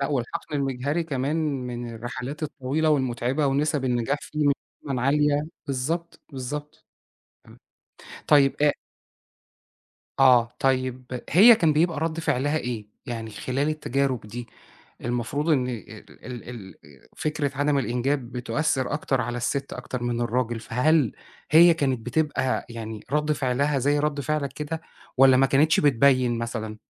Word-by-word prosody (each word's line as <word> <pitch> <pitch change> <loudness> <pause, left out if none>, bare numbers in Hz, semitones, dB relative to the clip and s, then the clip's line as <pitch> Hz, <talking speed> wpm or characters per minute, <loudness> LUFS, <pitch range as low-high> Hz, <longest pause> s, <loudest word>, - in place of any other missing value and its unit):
لأ، 140 - +1
والحَقْن 145 +3 -3
المِجهري 140 +4 -1
كمان 140 0 -1 0.3
من 120 -1 -5
الرحلات 125 +6 -6
الطويلة 150 +1 -1
والمُتعِبة 130 +1 +1
ونِسَب 140 0 0
النجاح 120 +2 0
فيه 150 -1 -2
مش 140 - +4 0.3
دايمًا 135 -4 -3
عالية. 145 +2 +2 0.2
بالضبط، 160 +6 -3
بالضبط. 145 +3 -6 0.6
تمام. - - -17 0.7
طيب 140 -2 +5
أ 150 - +5 1.5
آه، 125 -3 +5
طيب 130 -1 -1
هي 220 +8 +9
كان 165 -5 +3
بيبقى 160 +1 +1
رَد 165 0 -1
فِعلها 145 -1 0
إيه؟ 120 -6 -4 0.2
يعني 115 -2 -5
خلال 130 +7 -2
التجارب 140 -4 -1
دي 120 +3 -7 0.5
المفروض 120 +6 -2
إن 130 -5 +2
ال 120 -5 -7 0.3
ال 120 -2 -8
ال 105 -6 -9 0.4
فكرة 150 -2 -1
عدم 145 0 +2
الإنجاب 125 0 -1
بتؤثِّر 130 +2 -1
أكتر 140 -3 0
على 120 +1 -3
الست 135 +3 -2
أكتر 125 0 -5
من 120 -1 -1
الراجل، 120 -1 -1
فهل 125 +3 +2 0.4
هي 170 +2 +8
كانت 135 -6 0
بتبقى 145 -1 0
يعني 110 -2 -7
رَد 150 +1 +1
فِعلها 140 +1 0
زي 145 +3 +2
رَد 145 -1 0
فِعلك 145 -2 -2
كده، 150 +3 -5 0.4
والّا 130 0 +7
ما 135 +1 +5
كانتش 150 +4 +3
بتبيّن 130 -3 +3
مثلًا؟ 110 -2 -4
135 Hz, 140 wpm, -25 LUFS, 125-150 Hz, 1.5 s, هي